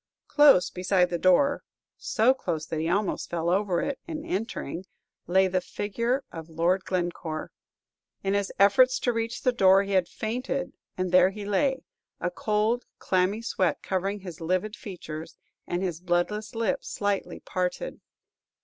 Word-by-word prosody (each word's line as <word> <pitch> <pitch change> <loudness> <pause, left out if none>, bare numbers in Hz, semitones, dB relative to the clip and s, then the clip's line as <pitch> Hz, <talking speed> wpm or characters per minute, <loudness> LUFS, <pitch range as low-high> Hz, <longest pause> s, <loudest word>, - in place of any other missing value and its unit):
Close 290 - +6
beside 180 0 +1
the 175 - -1
door 275 +12 +4 0.3
so 230 +4 +2
close 170 -11 -3
that 160 0 -3
he 160 +1 -1
almost 200 +3 0
fell 170 0 -1
over 190 -2 +1
it 280 -2 -3
in 315 -2 -5
entering 190 - -3 0.4
lay 190 +2 +4
the 185 0 0
figure 235 +8 -2
of 165 0 -8
Lord 170 +4 +1
Glencore. 175 -3 -3 0.7
In 195 0 0
his 200 -1 0
efforts 255 +6 +5
to 245 - 0
reach 230 0 -3
the 255 - +4
door 195 -4 +5
he 200 - -5
had 185 -3 +3
fainted, 250 +5 -3 0.2
and 185 -1 -1
there 185 0 +6
he 205 +1 -7
lay, 265 +6 +1 0.4
a - - -1
cold, 215 +3 0
clammy 190 +4 0
sweat 185 -5 0
covering 195 +2 -2
his 180 -3 -9
livid 185 +6 -1
features, 165 -7 -8 0.3
and 175 +2 -2
his 175 -4 -2
bloodless 185 +5 -1
lips 225 -4 -1
slightly 205 -1 -2
parted. 185 - -3
195 Hz, 155 wpm, -27 LUFS, 180-225 Hz, 0.7 s, Close